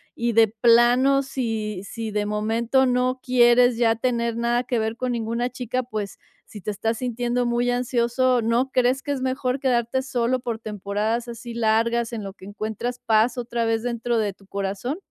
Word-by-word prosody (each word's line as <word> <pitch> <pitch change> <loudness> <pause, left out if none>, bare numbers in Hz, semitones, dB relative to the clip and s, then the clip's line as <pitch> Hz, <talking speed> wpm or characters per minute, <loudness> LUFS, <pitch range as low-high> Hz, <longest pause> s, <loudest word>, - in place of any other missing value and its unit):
Y 235 0 -1
de 225 0 +6
plano, 240 +5 +4
si 225 -7 -3
si 225 +2 -5
de 210 0 -1
momento, 225 +5 +1
no 250 +1 +1
quieres 245 -1 +4
ya 230 -1 +3
tener 235 -1 -1
nada 240 +1 +1
que 245 -1 -1
ver 220 +1 -2
con 255 0 -2
ninguna 235 +1 -1
chica, 255 0 -3
pues, 215 -5 -5 0.3
si 210 - -11
te 210 - -3
estás 225 +3 -2
sintiendo 245 0 -1
muy 240 +1 +1
ansioso, 245 0 +1
¿no 235 +4 +1
crees 255 +1 +2
que 290 - -3
es 275 -2 -2
mejor 260 0 -1
quedarte 250 -1 +1
solo 255 -1 0
por 235 -3 -4
temporadas 215 +2 -2
así 235 0 -8
largas 230 +1 +1
en 220 -2 -4
lo 195 -1 -7
que 190 - -15
encuentras 220 +4 -4
paz 225 +2 +3
otra 235 -1 -2
vez 225 0 0
dentro 235 -1 -1
de 210 -3 0
tu 195 0 -23
corazón? 200 - -3
235 Hz, 185 wpm, -23 LUFS, 220-250 Hz, 0.3 s, de